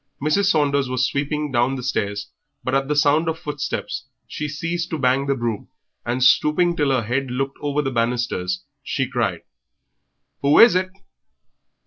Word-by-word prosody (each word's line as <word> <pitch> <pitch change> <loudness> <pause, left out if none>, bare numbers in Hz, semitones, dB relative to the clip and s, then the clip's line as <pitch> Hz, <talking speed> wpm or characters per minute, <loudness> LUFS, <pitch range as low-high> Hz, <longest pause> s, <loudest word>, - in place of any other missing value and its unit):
Mrs. 155 +8 +1
Saunders 140 -7 +2
was 130 0 +1
sweeping 145 +2 -2
down 125 +2 +1
the 130 - -6
stairs, 100 -5 -2 0.3
but 130 - -2
at 135 0 +1
the 150 - 0
sound 150 +3 +3
of 160 - -2
footsteps 150 -3 -4 0.2
she 150 0 -4
ceased 165 +4 -3
to 160 - -2
bang 135 0 +1
the 140 - +1
broom, 120 -4 -3 0.4
and, 125 +2 -1
stooping 170 +6 +4
till 145 -4 +1
her 130 -3 +1
head 130 +4 -1
looked 135 +2 -3
over 145 0 0
the 135 - -2
banisters, 115 -7 -1 0.2
she 135 -1 -2
cried 115 -9 -1 1.0
"Who 140 +1 +4
is 235 - +9
it?" 185 +1 +1
135 Hz, 165 wpm, -22 LUFS, 125-150 Hz, 1.0 s, is